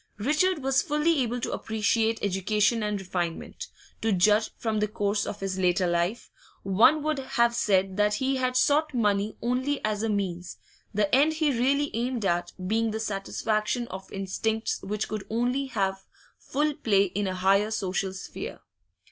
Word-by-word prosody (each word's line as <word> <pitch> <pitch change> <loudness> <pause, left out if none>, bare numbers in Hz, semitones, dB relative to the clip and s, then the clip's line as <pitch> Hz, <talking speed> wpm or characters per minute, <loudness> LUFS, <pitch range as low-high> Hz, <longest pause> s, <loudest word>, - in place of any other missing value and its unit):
Richard 300 - +1
was 270 0 +3
fully 300 +1 +1
able 245 0 -1
to - - -2
appreciate 220 +1 0
education 210 +4 +1
and 210 -1 -1
refinement; 175 -3 -4 0.3
to 225 - +1
judge 210 +4 +3
from 220 -2 -1
the 210 - +1
course 205 -1 -1
of 205 - -6
his 190 -1 -3
later 180 0 +2
life, 175 +6 -1 0.3
one 220 +11 +4
would 305 -2 0
have 235 -3 +1
said 195 -4 +1
that 210 0 +3
he 265 +4 0
had 255 0 0
sought 295 +2 +2
money 210 -2 +1
only 260 +4 0
as 210 -1 -1
a 225 - -1
means, 185 -4 -3 0.3
the 205 -1 0
end 290 +5 +5
he 310 -2 +1
really 275 +4 +1
aimed 240 -2 -1
at 175 -1 0
being 225 +3 +1
the 220 0 -3
satisfaction 215 +3 -1
of 190 +1 -8
instincts 220 +3 -2
which 210 +1 -3
could 215 -2 -4
only 245 +4 0
have 195 -5 -2 0.4
full 295 +2 -1
play 200 -7 +2
in 200 +1 -2
a 185 - -2
higher 195 +3 +3
social 195 -3 -1
sphere. 190 - -7
215 Hz, 165 wpm, -27 LUFS, 195-250 Hz, 0.4 s, end